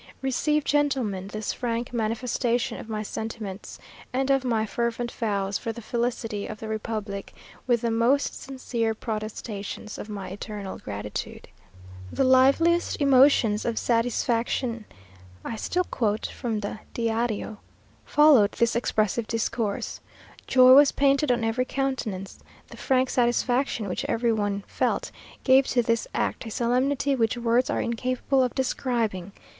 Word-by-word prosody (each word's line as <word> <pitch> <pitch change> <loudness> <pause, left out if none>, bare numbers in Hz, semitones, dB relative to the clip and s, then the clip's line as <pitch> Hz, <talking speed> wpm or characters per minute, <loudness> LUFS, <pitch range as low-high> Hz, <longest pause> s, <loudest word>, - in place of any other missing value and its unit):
Receive, 300 +3 +1
gentlemen, 260 -11 0
this 215 +1 -3
frank 240 0 -3
manifestation 235 +1 -1
of 225 - -10
my 215 -1 -3
sentiments, 215 -2 -6 0.3
and 265 +2 0
of 270 -1 +3
my 225 -4 +1
fervent 235 +2 -2
vows 200 -3 -1
for 230 - -3
the 230 - -8
felicity 235 -2 -2
of 215 - -7
the 220 - -6
republic, 215 -2 -4 0.3
with 240 -2 +2
the 235 - 0
most 240 +5 +2
sincere 240 -4 -2
protestations 215 -1 -5
of 215 - -7
my 195 -3 -5
eternal 200 0 -6
gratitude." 105 0 -6 0.6
"The - - +1
liveliest 275 +7 +4
emotions 265 -6 +4
of 235 -2 -2
satisfaction" 235 0 0 0.6
(I 230 - -3
still 360 +11 -1
quote 220 -9 -1
from 225 -5 -3
the 205 +1 -5 0.2
Díario) 230 -2 -1 0.5
"followed 290 -9 +5
this 235 -1 +1
expressive 220 -1 0
discourse. 230 -2 -2 0.5
Joy 255 -1 +7
was 285 +1 +8
painted 280 0 +2
on 240 -1 +1
every 225 +3 0
countenance. 255 -9 -3 0.3
The - - -11
frank 260 -1 +1
satisfaction 245 -1 +1
which 180 - -3
every 230 0 +1
one 205 -2 -1
felt - - -1 0.3
gave 265 0 +5
to 245 -1 +2
this 230 0 0
act - - -1
a - - -4
solemnity 260 +5 +1
which 230 -1 +1
words 240 +1 +2
are - - 0
incapable 255 +3 0
of 250 -1 0
describing. 230 -7 -1
235 Hz, 140 wpm, -26 LUFS, 215-255 Hz, 0.6 s, was